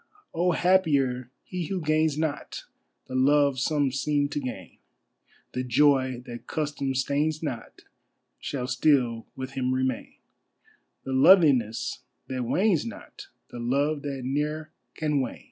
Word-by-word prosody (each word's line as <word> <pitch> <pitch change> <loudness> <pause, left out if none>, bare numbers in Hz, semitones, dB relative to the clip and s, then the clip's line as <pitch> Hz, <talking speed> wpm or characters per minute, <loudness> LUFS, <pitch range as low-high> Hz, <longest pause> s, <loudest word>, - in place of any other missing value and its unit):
Oh, 175 +1 +2
happier 140 -10 +2
he 180 -3 -5
who 190 -1 -2
gains 155 -1 +1
not 155 -2 -3 0.4
The - - -10
Love 140 +1 +3
some 145 0 +1
seem 145 +2 0
to 145 - -2
gain: 120 - -7 0.7
The 125 - -3
joy 130 -1 +2
that 120 -2 -9
custom 145 -3 -2
stains 145 +4 0
not 130 -7 -6 0.6
Shall 130 -3 -4
still 125 -3 +1
with 130 0 -6
him 130 -1 -1
remain, 130 -2 -2 0.9
The 135 - -4
loveliness 130 - +4 0.3
that 130 -1 -2
wanes 180 - +2
not, 115 - -9 0.2
The 120 - -7
love 140 +5 0
that 140 -2 -4
ne'er 150 +4 -2 0.2
can 150 -3 0
wane. 125 - -4
140 Hz, 130 wpm, -26 LUFS, 130-155 Hz, 0.9 s, loveliness